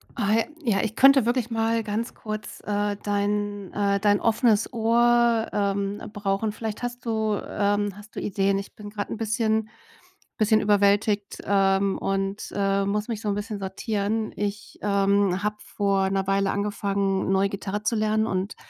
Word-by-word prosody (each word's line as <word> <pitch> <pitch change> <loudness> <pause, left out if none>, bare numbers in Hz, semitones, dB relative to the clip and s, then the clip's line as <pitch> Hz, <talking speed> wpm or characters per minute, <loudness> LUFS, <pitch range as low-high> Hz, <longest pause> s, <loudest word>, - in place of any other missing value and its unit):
Ah, 215 -3 +1
j 225 - +1 0.3
ja, 195 - +1
ich 220 -1 -3
könnte 270 -2 +6
wirklich 240 -1 0
mal 225 0 +1
ganz 220 +2 -3
kurz, 215 -1 -6
äh, 205 0 0
dein, 205 -1 -1
äh 200 -1 +1
dein 205 0 +3
offenes 225 -1 +2
Ohr, 235 0 +3
ähm, 200 0 -1
brauchen. 200 +1 -1
Vielleicht 220 0 -5
hast 245 0 -5
du, 220 -2 0
ähm 205 -1 0
hast 205 +1 -14
du - - -3
Ideen. 195 0 0
Ich 195 - -7
bin 210 -1 -9
grad 205 -1 -5
'n - - -4
bisschen 220 -1 0 0.7
bisschen 215 -1 +4
überwältigt, 205 0 +2
ähm. 195 0 +2
Und, 195 +1 -2
äh, 195 0 +1
muss 210 +1 -1
mich 225 -3 -4
so 210 - -2
'n 200 - 0
bisschen 205 +1 -4
sortieren. 205 +2 -2
Ich, 205 0 -4
ähm, 200 -2 +2
habe 210 +1 -1
vor 195 -2 0
'ner 195 0 -1
Weile 195 0 +2
angefangen 200 -1 -1
neu 195 +1 +3
Gitarre 200 +1 -4
zu 230 - +1
lernen. 215 0 +1
Und, 190 0 -2
205 Hz, 165 wpm, -25 LUFS, 200-220 Hz, 0.7 s, könnte